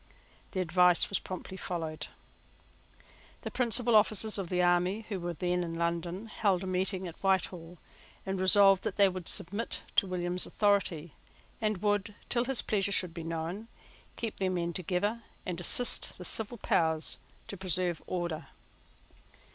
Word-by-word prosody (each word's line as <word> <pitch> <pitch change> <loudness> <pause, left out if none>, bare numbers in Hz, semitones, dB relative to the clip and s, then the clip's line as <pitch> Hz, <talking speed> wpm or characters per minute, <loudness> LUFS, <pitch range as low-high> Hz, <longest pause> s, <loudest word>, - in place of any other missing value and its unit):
The 185 - -1
advice 180 0 +4
was 200 - 0
promptly 185 0 -8
followed. 165 -4 -4 1.4
The - - -5
principal 240 -1 +3
officers 215 0 +4
of 185 -3 -4
the 180 - -1
army 180 +5 +1
who 200 -3 -3
were 175 0 -4
then 180 +2 -1
in 165 -1 -5
London 170 +4 -2
held 200 -4 0
a - - -4
meeting 185 0 0
at 170 - -11
Whitehall, 180 -3 -1 0.5
and 190 -1 -3
resolved 195 0 +6
that - - -3
they 200 -1 +5
would 185 -2 -3
submit 200 +6 0
to 195 - +4
William's 180 0 +1
authority, 185 -6 0 0.5
and 215 -3 -1
would, 205 0 0
till 240 0 +1
his 270 -1 +1
pleasure 200 -2 0
should 180 -3 +1
be 170 - -6
known, 165 +6 -5 0.5
keep 225 -2 -5
their 190 -1 0
men 170 -2 -2
together 195 +6 -2 0.2
and 180 -2 -4
assist 245 +6 +3
the 180 - -8
civil 220 +5 +1
power 160 -5 +1 0.5
to - - -7
preserve 180 -3 -2
order. 175 -3 -4
185 Hz, 155 wpm, -30 LUFS, 175-205 Hz, 1.4 s, resolved